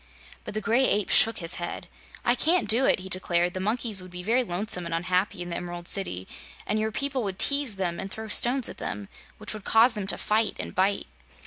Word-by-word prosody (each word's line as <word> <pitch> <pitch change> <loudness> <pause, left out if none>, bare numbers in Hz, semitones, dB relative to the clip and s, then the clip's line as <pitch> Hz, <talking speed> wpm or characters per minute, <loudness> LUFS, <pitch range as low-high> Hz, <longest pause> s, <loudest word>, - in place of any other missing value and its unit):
But - - -7
the 215 - -1
Gray 235 +5 +2
Ape 205 -1 +1
shook 225 - +6
his 165 -2 +1
head. 175 - -5 0.4
"I 240 - +4
can't 305 -1 +2
do 235 +5 +5
it," - - +3
he 190 - -8
declared. 175 -1 0
"The 185 - -4
monkeys 215 0 0
would 185 - -11
be 180 0 -8
very 235 +6 +2
lonesome 180 -3 -2
and 165 - -3
unhappy 180 +2 -1
in 175 - -8
the - - -2
Emerald 175 0 -6
City 95 - 0 0.4
and 215 - -1
your 220 0 -1
people 275 +3 -2
would 195 -2 -3
tease 280 -4 +2
them 180 -3 -2
and 195 - -4
throw 220 +2 -7
stones 245 +4 +3
at - - -10
them, 105 -1 -5 0.3
which 215 +1 -7
would 215 -2 -9
cause 225 +4 +4
them 205 -3 -4
to - - 0
fight 215 0 0
and - - -6
bite." 195 +2 0
200 Hz, 230 wpm, -26 LUFS, 180-225 Hz, 0.4 s, shook